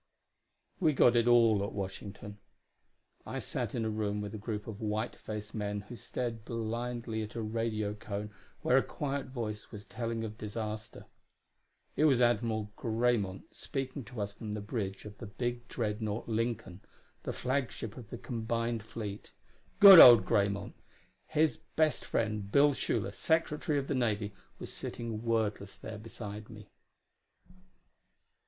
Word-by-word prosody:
We 160 -5 +3
got 125 -2 +5
it 120 0 +3
all 115 -4 +5
at 100 - -4
Washington. 100 +1 -6 0.8
I - - -5
sat - - -3
in 115 -2 -1
a - - 0
room 105 -1 -1
with 105 -1 -5
a - - -4
group 105 -1 -4
of 110 -1 -7
white 110 +2 -1
faced 105 0 -7
men 105 -2 -2
who 105 +4 -10
stared 115 0 -4
blindly 115 0 -3
at 110 +1 -6
a 115 - -2
radiocone 105 -1 -3 0.3
where 125 - +4
a - - +6
quiet 140 -1 -3
voice 110 -5 -5
was 105 -1 -9
telling 115 -1 -3
of 110 0 -6
disaster. 110 0 -5 0.9
It 155 - +3
was 135 -5 +5
Admiral 115 -3 +1
Graymont 115 -5 0
speaking 135 0 -4
to 125 -4 -6
us 100 0 -3
from 105 0 -6
the 105 - -3
bridge 100 -3 -4
of 105 -1 -10
the 115 - -7
big 120 +3 -3
dreadnaught, 110 -1 -2
Lincoln, 115 -5 -2 0.4
the - - -3
flagship 125 -4 -2
of 120 -5 -10
the 120 - -6
combined 115 -1 -2
fleet. 105 -1 -7 0.5
Good 195 -3 +12
old 120 -8 +11
Graymont! 100 -2 +1 0.5
His 155 0 +2 0.2
best 155 -1 +2
friend, 105 -3 -1
Bill 145 +3 +6
Schuler, - - -1
Secretary 155 -2 +1
of 140 - 0
the - - 0
Navy, 105 -5 0 0.2
was - - -7
sitting 115 -2 -4
wordless 110 -4 -1
there 110 -1 -8
beside 105 -1 -8
me. 105 -2 -12
110 Hz, 150 wpm, -32 LUFS, 105-120 Hz, 0.9 s, Good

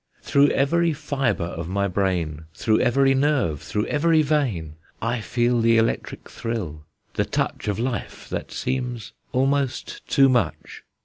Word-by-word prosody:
Through 140 0 +4
every 165 +5 +2
fibre 135 - -1
of 85 -1 -5
my 100 +1 0
brain, 90 -5 -1
Through 110 -2 +2
every 135 +2 +3
nerve, 135 - +1
through 105 0 -2
every 160 +1 +3
vein, 125 - 0 0.3
I 115 +1 -1
feel 120 +4 +1
the 115 0 +4
electric 115 0 -1
thrill, 85 -11 -5 0.3
the - - +1
touch - - -2
Of 105 - 0
life, 120 +2 -4
that - - -4
seems 125 -5 -3 0.2
almost 135 0 0
too 135 -1 +5
much. 125 -2 -1
120 Hz, 140 wpm, -23 LUFS, 100-135 Hz, 0.3 s, too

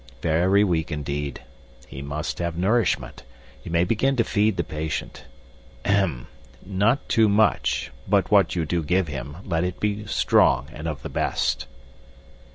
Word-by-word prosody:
Very 90 +5 +3
weak, 85 -5 0
indeed. 70 -2 -4 0.4
He 65 - -8
must 75 +3 -4
have 85 -1 -2
nourishment. 110 +6 0 0.4
You - - -8
may 85 0 +3
begin 115 +8 +1
to 120 - +3
feed 105 -2 +1
the 85 - +1
patient. 75 0 -5 0.6
Ahem! 95 -12 +1 0.4
Not 100 +8 +1
too 110 -2 +4
much, 70 - +2 0.2
but 100 0 +2
what 100 -5 +4
you 85 -2 0
do 85 +2 -1
give 90 +3 +1
him 70 +2 -6
let 85 -3 0
it 90 0 -3
be 105 0 -2
strong 65 -6 +3
and 75 +2 -6
of 75 -3 -5
the - - -5
best." - - -1
85 Hz, 155 wpm, -24 LUFS, 75-100 Hz, 0.6 s, too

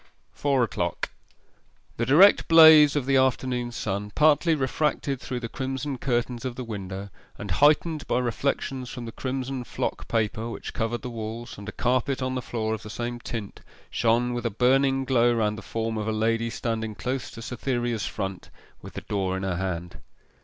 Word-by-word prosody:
FOUR 140 -3 +1
O'CLOCK 115 - -2 0.9
The 115 - -1
direct 180 +10 +6
blaze 160 -3 +8
of 145 -4 0
the 135 0 +3
afternoon 125 -1 +1
sun, 105 -3 -3
partly 155 +2 +4
refracted 140 -1 -1
through 125 -1 -4
the 115 - -3
crimson 135 +2 -4
curtains 120 -2 -1
of 130 -2 -4
the 130 - -5
window, 100 -3 -6 0.3
and 105 - -6
heightened 150 - +3
by - - +1
reflections 125 +1 -2
from 120 -1 -7
the 115 - -6
crimson 130 +1 -4
flock - - -4
paper 110 0 -1
which - - -7
covered 120 +2 -2
the 125 - -5
walls, 115 +1 -6
and 100 +1 -8
a - - -5
carpet 130 +3 0
on 130 0 -2
the 130 - -2
floor 110 -2 -2
of 110 - -4
the 105 - -9
same 120 +2 -4
tint, 115 -4 -6 0.3
shone 120 +2 +2
with 120 0 -2
a - - 0
burning 135 +4 +2
glow 120 -2 +3
round 105 -2 +1
the 110 - -8
form 115 -1 -3
of 105 - -3
a - - +1
lady 115 +1 0
standing 110 -2 -3
close 125 -2 -3
to 115 - -10
Cytherea's 120 -2 -2
front 95 -1 -5 0.3
with - - -11
the - - -6
door 95 -2 -2
in 95 - -5
her 95 -2 -1
hand. 90 -2 -4
120 Hz, 185 wpm, -26 LUFS, 110-130 Hz, 0.9 s, blaze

